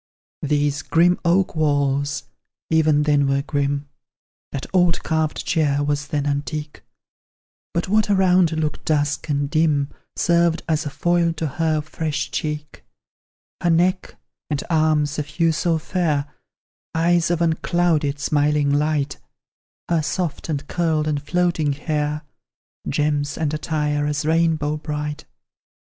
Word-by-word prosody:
These 145 -1 0
grim 175 +4 +3
oak 180 +1 +2
walls 145 -2 +1 0.5
even 155 -2 +4
then 145 -2 +3
were 135 0 +1
grim; 145 -1 -1 0.6
That 135 - -4
old 175 -2 +3
carved 160 -1 -1
chair 145 -3 +1
was 145 0 -1
then 145 -1 -1
antique; 145 +1 -3 0.9
But 170 - -1
what 215 +2 +2
around 185 -3 +4
looked 155 -2 -2
dusk 145 0 0
and 145 -1 0
dim 150 -2 +1 0.3
Served 170 -1 +2
as 155 -1 0
a - - -2
foil 170 +2 +1
to 160 0 -3
her 155 +1 0
fresh 155 -1 -3
cheek; 150 +1 -4 0.8
Her 175 - +1
neck 180 +3 +1 0.3
and 150 -1 -1
arms, 155 -2 +2
of 150 - -3
hue 165 +2 +1
so 165 +1 +1
fair, 155 -3 0 0.7
Eyes 170 +1 +3
of 175 -2 +1
unclouded, 165 -3 +1
smiling 145 0 +1
light; 150 0 0 0.7
Her 170 -2 +2
soft, 160 +1 -3
and 145 -2 -3
curled, 160 -2 0
and 145 -2 0
floating 170 -2 +1
hair, 150 +1 -2 0.7
Gems 145 0 0
and 155 -2 -1
attire, 150 -1 -1
as 150 0 -1
rainbow 160 -2 +1
bright. 150 -1 -4
155 Hz, 130 wpm, -22 LUFS, 145-165 Hz, 0.9 s, even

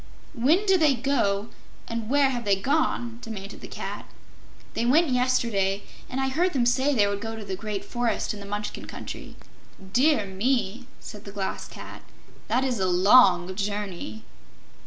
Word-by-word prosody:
"When 310 - +3
did 385 -2 +4
they 300 -4 +4
go, 230 -5 0 0.4
and 230 -1 -4
where 280 0 +4
have 240 -2 -3
they 200 -2 +3
gone?" 240 0 0
demanded 200 -3 -7
the - - -8
Cat. - - -6 0.6
"They 230 - -1
went 295 +7 +4
yesterday, 235 -6 +1 0.3
and 255 - -3
I 265 0 +1
heard 350 +7 +1
them 255 -4 +2
say 265 +4 +2
they 210 -4 +4
would 200 0 -2
go 225 0 -4
to 220 -2 -7
the 190 - -3
Great 210 0 -4
Forest 240 -2 -1
in 210 - -8
the 200 - -9
Munchkin 205 +1 -4
Country." - - -8 0.6
"Dear 255 -3 +4
me," 230 +3 -1
said 210 -1 -10
the 200 - -8
Glass 195 -1 -4
Cat; - - -10 0.5
"that 255 - +2
is 250 -5 -1
a 190 - +1
long 185 -1 +5
journey." 195 - -4
230 Hz, 170 wpm, -26 LUFS, 200-260 Hz, 0.6 s, long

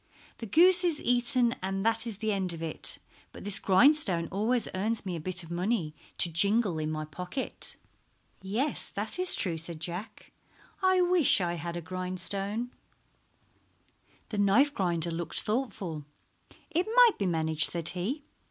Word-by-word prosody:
The 230 - -7
goose 360 - +5
is 335 -4 0
eaten 245 -1 +1
and 195 +1 -4
that 225 +1 +2
is 220 -4 -4
the 220 +1 -2
end 190 -3 -2
of 165 0 -8
it, 160 - -3 0.3
but - - -12
this 205 0 +5
grindstone 195 - +4
always 220 +4 +1
earns 210 +3 -2
me 185 -2 -4
a - - -5
bit 185 +3 -2
of 165 - -12
money 175 -2 -2 0.2
to 170 - +3
jingle 200 +1 +3
in 155 0 -3
my 155 0 -4
pocket." 180 - -7 0.7
"Yes, 225 +10 -1
that 215 - -2
is 365 0 +8
true," 170 -4 -2
said 165 0 -6
Jack. 175 +6 -7 0.5
"I 375 -1 +3
wish 355 - +4
I 175 -2 -2
had 170 +1 -6
a - - -5
grindstone." 185 +6 -3 1.6
The 210 - -4
knife 230 +9 +3
grinder 170 - -1
looked 165 0 -2
thoughtful. 200 - -4 0.7
"It 345 +3 -1
might - - +5
be 200 - -1
managed," 160 -2 +1
said 170 -1 -3
he. 225 - -4
195 Hz, 160 wpm, -28 LUFS, 170-240 Hz, 1.6 s, is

